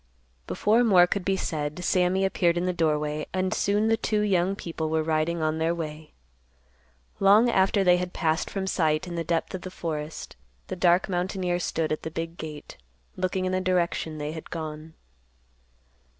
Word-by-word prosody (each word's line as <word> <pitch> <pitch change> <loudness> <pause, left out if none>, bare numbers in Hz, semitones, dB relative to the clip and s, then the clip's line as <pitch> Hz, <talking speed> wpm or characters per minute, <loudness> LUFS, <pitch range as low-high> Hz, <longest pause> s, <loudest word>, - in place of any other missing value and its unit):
Before 225 +4 +2
more 185 -6 +6
could 185 +1 -2
be 195 +1 +1
said, 155 0 -3
Sammy 185 +2 +2
appeared 175 -3 +1
in 175 - 0
the 180 - 0
doorway, 150 -2 0
and 185 0 0
soon 205 +2 +1
the 225 0 +3
two 215 -1 0
young 195 -2 +1
people 165 -4 -4
were 160 0 +1
riding 160 +1 0
on 155 0 0
their 165 +1 +1
way. 155 -2 -7 1.1
Long 210 +5 +5
after 195 0 +3
they 180 -1 +5
had 180 0 -3
passed 160 -1 0
from 195 -1 -3
sight 155 -4 +1
in 175 - -7
the 170 -1 -2
depth 165 0 -1
of 185 - -4
the 185 - -6
forest, 155 -3 -5 0.3
the - - -3
dark 175 0 +3
mountaineer 180 -1 -1
stood 165 -2 -1
at 155 - -1
the - - -5
big 165 +1 -5
gate, 155 -2 -8 0.4
looking 185 0 -1
in 185 - 0
the 185 0 0
direction 175 -3 0
they 150 0 -4
had 160 0 -8
gone. 155 0 -6
175 Hz, 180 wpm, -26 LUFS, 160-185 Hz, 1.1 s, more